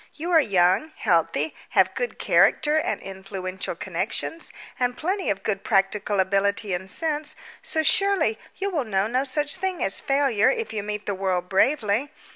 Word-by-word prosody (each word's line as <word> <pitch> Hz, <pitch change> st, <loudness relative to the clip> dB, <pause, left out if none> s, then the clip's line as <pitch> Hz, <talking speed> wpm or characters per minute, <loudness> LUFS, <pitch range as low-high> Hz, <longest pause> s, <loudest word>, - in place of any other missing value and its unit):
You 335 Hz, +3 st, -4 dB
are 330 Hz, -, +7 dB
young, 190 Hz, -, +2 dB
healthy, 170 Hz, -, +1 dB, 0.2 s
have -, -, +5 dB
good -, -, -3 dB
character 300 Hz, 0 st, +3 dB
and -, -, -2 dB
influential 190 Hz, -1 st, -6 dB
connections, 330 Hz, -, -4 dB, 0.3 s
and 245 Hz, -1 st, 0 dB
plenty 375 Hz, +4 st, -1 dB
of 195 Hz, -1 st, -1 dB
good 200 Hz, -2 st, -1 dB
practical 205 Hz, -1 st, +1 dB
ability 200 Hz, +1 st, +1 dB
and 190 Hz, +2 st, -4 dB
sense, 305 Hz, -, -2 dB, 0.3 s
so, 315 Hz, -, -1 dB
surely, 350 Hz, -, +2 dB, 0.2 s
you 395 Hz, +1 st, -2 dB
will 310 Hz, -6 st, 0 dB
know 195 Hz, -4 st, 0 dB
no 250 Hz, +4 st, 0 dB
such 290 Hz, +4 st, -1 dB
thing 375 Hz, -1 st, -2 dB
as 195 Hz, -, +1 dB
failure 275 Hz, -6 st, +2 dB
if 460 Hz, -, -2 dB
you 215 Hz, -, -2 dB
meet 210 Hz, 0 st, -5 dB
the 200 Hz, -, -1 dB
world 185 Hz, -2 st, -2 dB
bravely. 225 Hz, +3 st, +2 dB
215 Hz, 165 wpm, -24 LUFS, 195-310 Hz, 0.3 s, are